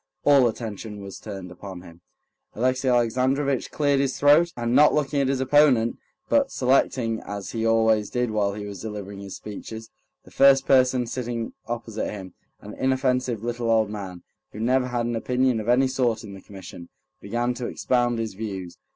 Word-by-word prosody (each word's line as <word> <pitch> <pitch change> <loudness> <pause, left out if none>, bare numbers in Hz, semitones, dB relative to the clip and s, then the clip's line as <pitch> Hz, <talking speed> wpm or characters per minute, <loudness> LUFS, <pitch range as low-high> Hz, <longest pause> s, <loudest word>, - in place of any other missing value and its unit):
All 140 -4 +5
attention 110 -2 -6
was 100 -1 -9
turned 95 -4 -8
upon 90 0 -9
him. 85 -1 -15 0.5
Alexey 130 +3 0
Alexandrovitch 130 +3 +1
cleared 145 -2 +1
his 135 -1 0
throat, 150 +4 +5
and 120 0 -1
not 150 +3 +6
looking 145 -1 0
at 135 - +1
his 135 -1 0
opponent, 130 -4 +3 0.3
but 280 -1 +2
selecting, 125 -3 +1
as 100 -1 -6
he 115 -1 -1
always 110 -2 +3
did 125 -2 -1
while 100 -2 0
he 105 -1 -6
was 100 -2 -8
delivering 100 -2 -7
his 100 -1 -8
speeches, 110 +2 -9 0.3
the - - -18
first 135 -1 +5
person 130 -2 +3
sitting 120 -1 -4
opposite 115 -2 -4
him, 95 -3 -8 0.3
an 105 - -9
inoffensive 130 -3 0
little 120 0 -2
old 110 -2 +2
man, 95 -4 -7 0.3
who 105 - -8
never 125 +3 +1
had 120 -1 -2
an 120 0 -2
opinion 125 +1 +1
of 110 +2 -4
any 130 +2 +4
sort 125 -4 0
in 100 -2 -9
the 95 - -11
Commission, 90 -3 -11 0.3
began 120 +4 -1
to 120 0 -5
expound 120 -2 0
his 115 -2 -3
views. 95 -4 -6
120 Hz, 175 wpm, -24 LUFS, 105-130 Hz, 0.5 s, not